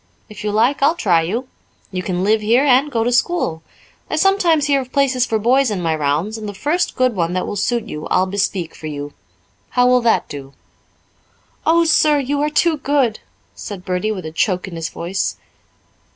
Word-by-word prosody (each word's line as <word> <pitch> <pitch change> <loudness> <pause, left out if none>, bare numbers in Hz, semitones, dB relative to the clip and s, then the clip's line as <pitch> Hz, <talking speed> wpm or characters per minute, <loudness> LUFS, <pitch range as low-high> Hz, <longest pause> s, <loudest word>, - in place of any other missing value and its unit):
If 210 -1 -10
you 210 - -1
like, 240 +8 +2
I'll 290 +4 +4
try 175 - +2
you. 225 +11 -3 0.4
You 185 -1 -3
can 180 -1 -2
live 215 +2 +2
here, 235 +5 +3
and 275 +1 +4
go 230 -3 0
to 240 - 0
school. 245 - 0 0.5
I - - -1
sometimes 350 -6 +3
hear 280 -2 +2
of 255 -1 -10
places 260 -3 +2
for 220 - +1
boys 250 +4 +3
in 205 -3 -2
my 165 -2 0
rounds, 155 +9 -1
and 210 -1 -6
the 205 - -8
first 300 - -1
good 255 -3 +1
one 170 -1 -1
that 185 - -1
will - - -4
suit 235 +3 0
you, 150 -7 -6
I'll 185 - +2
bespeak 190 -3 -2
for 155 - -8
you. 145 -1 -6 0.6
How 245 0 +2
will 250 0 +4
that 235 -1 +2
do?" 140 -1 -9 1.1
"Oh, 335 +1 +4
sir, 305 -2 +4
you 285 +1 -1
are 300 - +1
too 315 +1 +2
good," 275 -6 0 0.3
said 195 -3 -8
Bertie 185 +3 -1
with 185 -5 -5
a 155 - -5
choke 180 +3 0
in 180 - -8
his 165 0 -4
voice. 180 +3 -3
220 Hz, 205 wpm, -19 LUFS, 180-275 Hz, 1.1 s, I'll